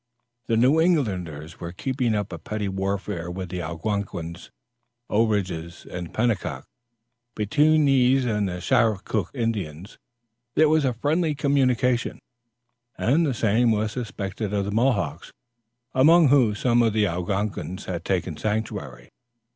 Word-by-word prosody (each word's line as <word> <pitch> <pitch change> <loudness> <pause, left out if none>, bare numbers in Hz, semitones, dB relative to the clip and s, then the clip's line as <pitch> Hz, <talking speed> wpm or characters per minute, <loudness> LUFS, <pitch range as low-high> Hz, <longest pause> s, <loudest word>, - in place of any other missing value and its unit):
The 115 - +2
New 130 +7 +4
Englanders 90 - -1
were 85 - -6
keeping 125 +1 -1
up 105 -1 -3
a - - -6
petty 105 -1 -4
warfare 95 -3 -3
with 90 0 -5
the 90 0 -4
Owenagungas, 85 0 -4 0.6
Ourages 95 -6 -1
and 90 -1 -7
Penocooks. 115 -2 -1 0.7
Between 150 +8 +3
these 135 -1 +4
and 105 -4 0
the 90 0 -5
Schakook 110 -3 +1
Indians, 100 - -3 0.6
there 155 -1 +5
was 155 -2 +3
a 130 - +1
friendly 155 +5 0
communication, 130 -4 +1 0.8
and 150 +7 +2
the 135 - 0
same 115 +2 +2
was 110 -1 +1
suspected 105 -3 -4
of 100 -1 0
the 100 - -3
Mohawks, 105 - 0 0.6
among 155 +3 +6
whom 125 -7 +4
some 120 +3 +2
of 115 -2 +2
the 105 -1 +3
Owenagungas 95 0 -3
had 85 -2 -4
taken 90 -3 -1
sanctuary. 100 - -4
105 Hz, 130 wpm, -24 LUFS, 95-125 Hz, 0.8 s, among